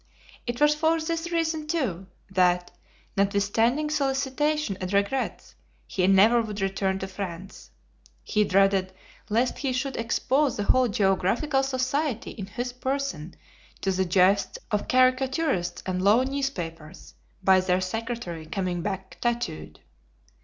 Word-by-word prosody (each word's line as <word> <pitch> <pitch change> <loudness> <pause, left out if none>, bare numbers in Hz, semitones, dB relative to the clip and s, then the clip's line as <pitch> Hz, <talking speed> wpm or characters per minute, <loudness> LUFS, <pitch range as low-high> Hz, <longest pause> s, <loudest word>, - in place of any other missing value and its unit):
It 240 0 -3
was 295 0 +5
for 320 +2 +1
this 330 +1 -3
reason 320 -2 -1
too, 235 - -2 0.2
that, 180 -1 +2 0.4
notwithstanding 220 +9 +1
solicitation 280 -2 0
and 185 0 -3
regrets, 200 +6 -1 0.3
he 185 -1 0
never 210 +5 +6
would 210 -2 -5
return 195 0 0
to 190 - -4
France. 190 -1 -7 0.5
He 210 -1 +1
dreaded 195 -1 +2 0.4
lest 235 +4 +1
he 275 -2 -1
should 255 +1 -2
expose 260 +4 +1
the 205 - -1
whole 255 +4 +3
Geographical 205 +8 +1
Society 265 -1 -1
in 195 -4 -7
his 245 +5 -4
person 255 - -3 0.5
to 195 - +1
the 190 0 0
jests 185 +3 +3
of 210 -1 -1
caricaturists 255 - +1
and 185 -1 -2
low 210 +6 +5
newspapers, 185 - -5 0.3
by 190 0 +6
their 185 0 +1
secretary 185 -4 -4
coming 180 -1 -2
back 190 0 -5
tattooed. 80 - -3
210 Hz, 130 wpm, -26 LUFS, 190-270 Hz, 0.5 s, never